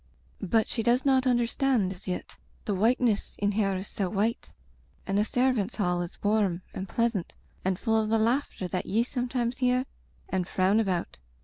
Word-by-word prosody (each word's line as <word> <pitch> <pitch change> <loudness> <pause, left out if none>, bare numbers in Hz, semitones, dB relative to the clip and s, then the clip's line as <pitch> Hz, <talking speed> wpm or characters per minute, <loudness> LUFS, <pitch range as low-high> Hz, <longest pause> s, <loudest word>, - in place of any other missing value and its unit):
" - - -33
But 220 +4 +2
she 230 - -2
does 240 +4 +2
not 265 -1 +3
understand 240 -4 +2
as 185 - -14
yet, 180 - -4 0.3
the 205 - 0
whiteness 225 +2 +1
in 205 0 +1
her 200 -2 +1
is 190 +2 -5
so 195 -3 -2
white, 215 +3 -1 0.5
and 195 - -2
the 205 - +4
ser 255 +4 +2
vants' 215 -1 -2
hall 180 -4 0
is 175 - -6
warm 205 -4 +1
and 190 0 -5
pleasant 230 -6 -1 0.3
and 185 -1 0
full 220 +2 +2
of 215 - -2
the 225 - +3
laughter 230 -3 0
that 180 0 -3
ye 225 +4 +2
sometimes 245 -1 -2
hear 250 0 +2 0.4
and 185 -2 -1
frown 190 +4 +2
about. 185 - -1
215 Hz, 190 wpm, -28 LUFS, 190-240 Hz, 0.5 s, the